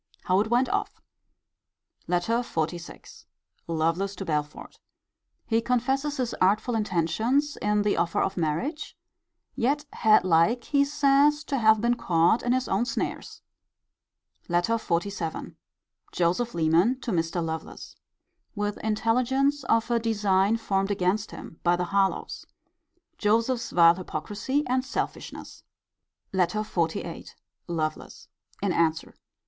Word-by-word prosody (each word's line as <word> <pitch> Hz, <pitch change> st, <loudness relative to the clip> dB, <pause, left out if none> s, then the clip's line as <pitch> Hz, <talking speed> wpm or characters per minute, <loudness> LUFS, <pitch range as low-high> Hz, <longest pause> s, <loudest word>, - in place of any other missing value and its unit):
How 185 Hz, +1 st, +2 dB
it 215 Hz, +2 st, 0 dB
went 245 Hz, +2 st, +3 dB
off. 405 Hz, +1 st, -2 dB, 1.1 s
LETTER 180 Hz, +6 st, +1 dB
XLVI. 170 Hz, -6 st, -5 dB, 0.4 s
Lovelace 165 Hz, +5 st, -1 dB
to 195 Hz, -, -6 dB
Belford. 150 Hz, -2 st, -4 dB, 0.7 s
He 225 Hz, 0 st, +1 dB
confesses 265 Hz, +5 st, 0 dB
his 250 Hz, -3 st, -2 dB
artful 210 Hz, +6 st, +2 dB
intentions 220 Hz, -, 0 dB
in 210 Hz, 0 st, +1 dB
the 210 Hz, -, +1 dB
offer 170 Hz, 0 st, 0 dB
of 195 Hz, -, 0 dB
marriage: 175 Hz, -, -3 dB, 0.6 s
yet 280 Hz, +4 st, 0 dB
had 215 Hz, -3 st, +4 dB
like, 185 Hz, +8 st, +3 dB
he 280 Hz, -1 st, +2 dB
says, 290 Hz, +1 st, +3 dB
to 275 Hz, -3 st, -2 dB
have 220 Hz, -1 st, +4 dB
been 235 Hz, +1 st, +2 dB
caught 175 Hz, -2 st, +2 dB
in 245 Hz, -, -1 dB
his 255 Hz, +1 st, +1 dB
own 200 Hz, +5 st, +1 dB
snares. 235 Hz, -, -4 dB, 1.1 s
LETTER 175 Hz, +7 st, +1 dB
XLVII. 170 Hz, -3 st, -3 dB, 0.6 s
Joseph 180 Hz, +8 st, 0 dB
Leman 170 Hz, +10 st, +2 dB
to 240 Hz, -, -3 dB
Mr. 165 Hz, -1 st, -1 dB
Lovelace. 160 Hz, 0 st, -7 dB, 0.6 s
With 205 Hz, 0 st, -2 dB
intelligence 255 Hz, +6 st, +1 dB
of 225 Hz, 0 st, +1 dB
a 235 Hz, -, +3 dB
design 210 Hz, -2 st, +2 dB
formed 195 Hz, -3 st, -1 dB
against 200 Hz, +2 st, 0 dB
him 160 Hz, -, -11 dB
by 175 Hz, 0 st, +3 dB
the 180 Hz, 0 st, -2 dB
Harlowes. 195 Hz, +1 st, -1 dB, 0.8 s
Joseph's 230 Hz, +3 st, +1 dB
vile 170 Hz, -1 st, +6 dB
hypocrisy 205 Hz, -, -3 dB
and 255 Hz, +1 st, 0 dB
selfishness. -, -, -5 dB, 0.7 s
LETTER 190 Hz, +3 st, +1 dB
XLVIII. 170 Hz, -6 st, -3 dB, 0.4 s
Lovelace. 160 Hz, -2 st, -4 dB, 0.3 s
In 195 Hz, -3 st, +1 dB
answer. 160 Hz, -2 st, 0 dB
210 Hz, 120 wpm, -26 LUFS, 175-245 Hz, 1.1 s, vile